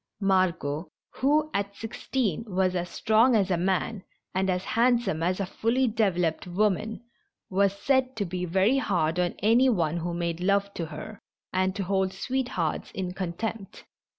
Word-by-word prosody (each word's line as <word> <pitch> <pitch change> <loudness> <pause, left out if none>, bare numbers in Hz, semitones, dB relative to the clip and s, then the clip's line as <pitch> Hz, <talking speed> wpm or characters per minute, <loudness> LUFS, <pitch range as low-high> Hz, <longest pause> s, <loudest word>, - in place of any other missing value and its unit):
Margot, 185 -6 +1 0.3
who 300 +3 +2
at 200 0 -2
six 225 +2 -8
teen 230 -8 0
was 185 -2 +1
as 175 0 -2
strong 225 +7 +3
as 195 -3 +2
a - - +3
man, 190 +3 -1 0.3
and 190 +1 0
as 180 0 0
handsome 235 -8 +2
as 180 +3 0
a 195 - 0
fully 235 +7 +1
developed 185 -7 0
woman, 210 +4 0 0.5
was 200 +1 +2
said 260 +3 +1
to 205 - -1
be 180 0 -4
very 190 +9 +3
hard 175 -7 0
on 180 -1 0
any 235 +5 +5
one 170 -7 +1
who 170 0 -3
made 170 -1 -2
love 200 +2 +1
to 165 - -4
her, 215 +6 -8 0.3
and 185 0 +1
to 200 - -2
hold 190 0 0
sweethearts 240 -8 -2
in 185 -2 -3
con 185 -2 -3
tempt. 220 +1 -5
195 Hz, 170 wpm, -27 LUFS, 180-225 Hz, 0.5 s, any